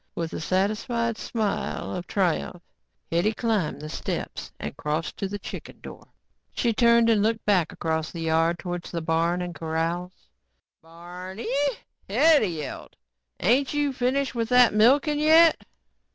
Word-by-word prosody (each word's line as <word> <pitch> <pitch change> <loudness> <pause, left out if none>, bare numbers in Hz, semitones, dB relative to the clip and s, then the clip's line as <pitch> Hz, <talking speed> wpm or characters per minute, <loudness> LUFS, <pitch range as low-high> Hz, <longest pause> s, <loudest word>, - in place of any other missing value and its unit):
With 165 -1 -4
a - - -4
satisfied 215 +6 -1
smile 215 -4 -3
of 180 -1 -5
triumph, 180 -2 -1 0.5
Hetty 175 +6 +2
climbed 210 -11 -1
the 155 - -6
steps - - -5
and - - -5
crossed 150 +2 -3
to 195 - -2
the 205 +1 -5
kitchen 200 - -9
door. - - -11 0.5
She 235 -2 +1
turned 235 0 +4
and 220 -3 +3
looked 225 +1 0
back 185 -6 +2
across 160 -1 -2
the 170 - -7
yard 165 +1 +1
towards 175 0 -5
the 170 - -4
barn 165 +2 0
and 175 -1 -5
corrals. 165 +3 -3 0.6
"Barneeeeey," 185 - -4 0.3
Hetty 285 +3 +4
yelled. 155 -5 -6 0.4
"Ain't 260 +9 +2
you 290 -2 +1
finished 260 +2 0
with 230 -2 -2
that 250 -2 +6
milking 280 +8 +4
yet?" 320 +2 +5
200 Hz, 145 wpm, -25 LUFS, 170-235 Hz, 0.6 s, that